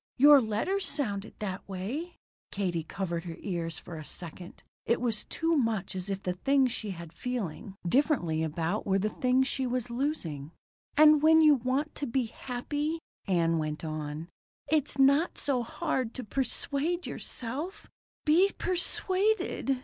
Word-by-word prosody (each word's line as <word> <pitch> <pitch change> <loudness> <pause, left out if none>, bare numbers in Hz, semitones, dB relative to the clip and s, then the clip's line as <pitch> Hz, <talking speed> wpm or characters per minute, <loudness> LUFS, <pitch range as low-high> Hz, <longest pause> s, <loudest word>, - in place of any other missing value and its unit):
Your 285 +1 +8
letters 295 - 0
sounded 205 -8 -2
that 200 -2 -5
way." 245 - -4 0.3
Katie 180 -5 -1
covered 170 0 -4
her 165 -1 -6
eyes 170 -4 -2
for 170 - -8
a - - -7
second. 175 +2 -8 0.2
It 235 - +1
was 230 -4 -1
too 330 0 0
much 225 - 0
as 185 +1 -4
if 195 0 -3
the 180 - -1
things 270 +6 +2
she 215 -2 -4
was 170 -1 -8
feeling 205 -6 -4
differently 175 - +2
about 165 +6 -1
were 195 0 +3
the 210 +2 0
things 255 +1 +2
she 265 -2 -1
was 245 -1 -2
losing. 175 - -3 0.4
"And 305 -1 +8
when 320 +1 +7
you 305 -1 +7
want 270 +4 0
to 285 - -4
be 255 +2 +1
happy," 290 +7 -3 0.3
Ann 165 -3 +2
went 155 +1 -3
on, 155 +1 -4 0.4
"it's 300 -3 +1
not 280 +5 +4
so 265 -4 0
hard 235 0 -2
to 255 - -4
persuade 280 - -1
yourself 300 - -5 0.4
be 340 +6 +5
persuaded." 370 -4 +1
240 Hz, 150 wpm, -29 LUFS, 180-290 Hz, 0.4 s, Your